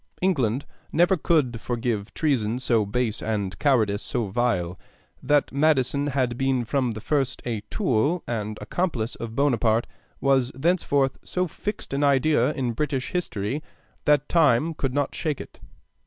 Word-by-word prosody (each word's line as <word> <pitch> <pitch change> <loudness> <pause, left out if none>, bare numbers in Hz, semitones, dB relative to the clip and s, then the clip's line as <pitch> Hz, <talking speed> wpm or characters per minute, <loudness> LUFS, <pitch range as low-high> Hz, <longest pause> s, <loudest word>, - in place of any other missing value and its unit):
England 135 - +1 0.3
never 175 +4 +4
could 145 -9 +1
forgive 115 -4 -2
treason 125 -7 +1
so 115 -5 +1
base 115 +1 -1
and 100 -4 -2
cowardice 110 -8 +2
so 120 -3 -1
vile. 95 -6 0 0.4
That 145 -1 +2
Madison 140 -1 +2
had 130 -4 -1
been 135 -2 +1
from 130 -1 0
the 110 - -6
first 135 0 0
a 115 -4 -2
tool 155 - +1
and 110 -2 -3
accomplice 120 -1 -2
of 115 -1 -6
Bonaparte 120 -5 +2 0.3
was 135 -2 +2
thenceforward 140 -3 +2
so 180 0 -1
fixed 205 0 -5
an 140 +1 0
idea 145 +2 +3
in 125 -4 -1
British 135 0 -2
history 130 - -2 0.4
that 145 -1 +3
time 155 -1 +3
could 135 -3 -2
not 145 -1 0
shake 155 -4 -2
it. - - -10
130 Hz, 145 wpm, -25 LUFS, 115-145 Hz, 0.4 s, never